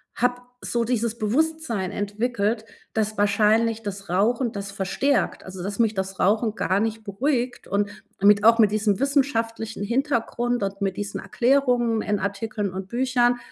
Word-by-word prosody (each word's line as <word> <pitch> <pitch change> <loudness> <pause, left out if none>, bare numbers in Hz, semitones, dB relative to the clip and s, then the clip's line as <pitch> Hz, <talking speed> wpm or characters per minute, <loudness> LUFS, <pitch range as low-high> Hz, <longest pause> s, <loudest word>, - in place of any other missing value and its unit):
habe 245 +1 0 0.2
so 235 -1 -1
dieses 235 -1 -1
Bewusstsein 240 - 0
entwickelt, 215 +1 -1 0.3
dass 215 -1 -1
wahrscheinlich 215 +2 +3
das 200 -2 -6
Rauchen 230 +7 +1
das 200 -1 -6
verstärkt, 235 +8 0
also 185 -1 -8
dass 200 +2 -4
mich 225 -2 +2
das 190 -1 -4
Rauchen 215 +3 +2
gar 190 -2 +1
nicht 220 +1 -2
beruhigt. 245 +4 -1
Und 205 +1 0 0.3
mit 200 +1 +5
auch 230 +1 +7
mit 215 -3 +5
diesem 210 -1 +1
wissenschaftlichen 230 -6 0
Hintergrund 240 -1 0
und 195 0 -4
mit 195 -1 -1
diesen 205 0 -4
Erklärungen 240 0 +2
in 205 -1 -1
Artikeln 200 0 -3
und 190 0 -5
Büchern, 245 0 +2
220 Hz, 150 wpm, -24 LUFS, 200-240 Hz, 0.3 s, auch